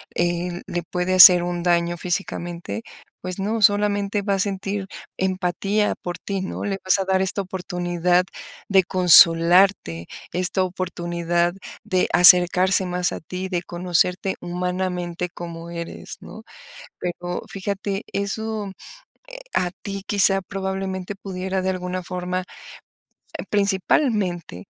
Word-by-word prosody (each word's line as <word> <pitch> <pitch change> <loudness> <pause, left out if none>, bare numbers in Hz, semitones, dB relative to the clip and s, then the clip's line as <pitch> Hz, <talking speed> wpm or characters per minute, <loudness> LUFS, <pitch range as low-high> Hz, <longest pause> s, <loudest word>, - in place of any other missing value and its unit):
eh, 175 0 -1
le 175 - -3
puede 180 +2 -2
hacer 180 -1 +10
un 175 0 -3
daño 170 0 +1
físicamente? 175 +1 -4 0.4
Pues 185 +1 -5
no, 215 +3 -2
solamente 205 0 +2
va 200 0 0
a 195 - 0
sentir 195 0 -2 0.3
empatía 190 +3 0
por 175 -1 -5
ti, 195 -1 -4
¿no? 190 - -5
Le 195 -1 -2
vas 185 - +4
a 195 - -2
dar 190 0 +1
esta 190 +1 0
oportunidad 180 -1 0 0.4
de 190 -2 +4
consolarte, 175 - +5 0.3
esta 185 +1 +1
oportunidad 175 -1 -2 0.3
de 185 -1 +1
acercarse 180 +1 +6
más 180 0 -1
a - - -5
ti, 185 +3 -6
de 180 -2 -2
conocerte 180 +2 -1
humanamente 180 0 -3
como 170 -1 -8
eres, 170 -1 -7
¿no? 220 - -11 0.6
Pero 175 0 -4
fíjate, 200 +1 -4
eso, 205 0 -3 0.6
eh, - - -8 0.2
a 180 -1 0
ti 195 -1 -6
quizá 195 -1 +3
probablemente 190 0 -4
pudiera 190 -1 -4
de 190 0 -1
alguna 180 0 -4
forma, 180 +1 -3 1.1
principalmente, 195 - 0
185 Hz, 125 wpm, -22 LUFS, 175-195 Hz, 1.1 s, hacer